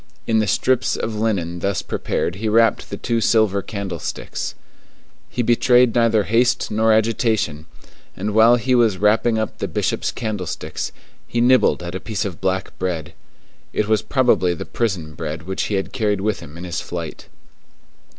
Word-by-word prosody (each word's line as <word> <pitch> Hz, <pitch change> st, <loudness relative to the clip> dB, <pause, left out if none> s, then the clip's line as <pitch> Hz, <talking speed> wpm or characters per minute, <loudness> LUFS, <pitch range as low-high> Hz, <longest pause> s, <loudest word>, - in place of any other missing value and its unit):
In 110 Hz, -1 st, +2 dB
the 110 Hz, -, +1 dB
strips 130 Hz, +6 st, +1 dB
of 110 Hz, -, -3 dB
linen 100 Hz, -6 st, -1 dB
thus 100 Hz, +2 st, -1 dB
prepared 85 Hz, -, -2 dB
he 110 Hz, +2 st, -1 dB
wrapped 115 Hz, +1 st, +3 dB
the -, -, -5 dB
two 115 Hz, -1 st, -1 dB
silver 110 Hz, -3 st, +3 dB
candlesticks. 95 Hz, -5 st, -5 dB, 0.7 s
He 120 Hz, -, -1 dB
betrayed 120 Hz, +1 st, +4 dB
neither 115 Hz, -3 st, +3 dB
haste 120 Hz, +4 st, +1 dB
nor 110 Hz, +1 st, +3 dB
agitation; 110 Hz, -8 st, +1 dB, 0.5 s
and 105 Hz, +2 st, -2 dB
while 115 Hz, +2 st, +6 dB
he 125 Hz, +2 st, 0 dB
was 115 Hz, -6 st, +3 dB
wrapping 110 Hz, +3 st, +3 dB
up 110 Hz, -, -3 dB
the -, -, -2 dB
Bishop's -, -, -1 dB
candlesticks, 105 Hz, -8 st, -4 dB, 0.4 s
he 120 Hz, -, -2 dB
nibbled 125 Hz, -6 st, +4 dB
at 85 Hz, 0 st, -5 dB
a 95 Hz, -, -3 dB
piece 110 Hz, +1 st, -3 dB
of 95 Hz, -5 st, -6 dB
black 95 Hz, 0 st, -1 dB
bread. 85 Hz, -3 st, -3 dB, 0.6 s
It 105 Hz, -, 0 dB
was 110 Hz, -1 st, +2 dB
probably 120 Hz, -10 st, +2 dB
the -, -, -6 dB
prison 90 Hz, -10 st, -2 dB
bread 75 Hz, 0 st, -5 dB
which 95 Hz, +3 st, -2 dB
he 105 Hz, -, -1 dB
had 95 Hz, -, -3 dB
carried 105 Hz, -4 st, 0 dB
with 105 Hz, 0 st, -1 dB
him 75 Hz, +3 st, -11 dB
in 85 Hz, -, -8 dB
his 85 Hz, -1 st, -3 dB
flight. 85 Hz, -3 st, -6 dB
105 Hz, 170 wpm, -21 LUFS, 90-115 Hz, 0.7 s, while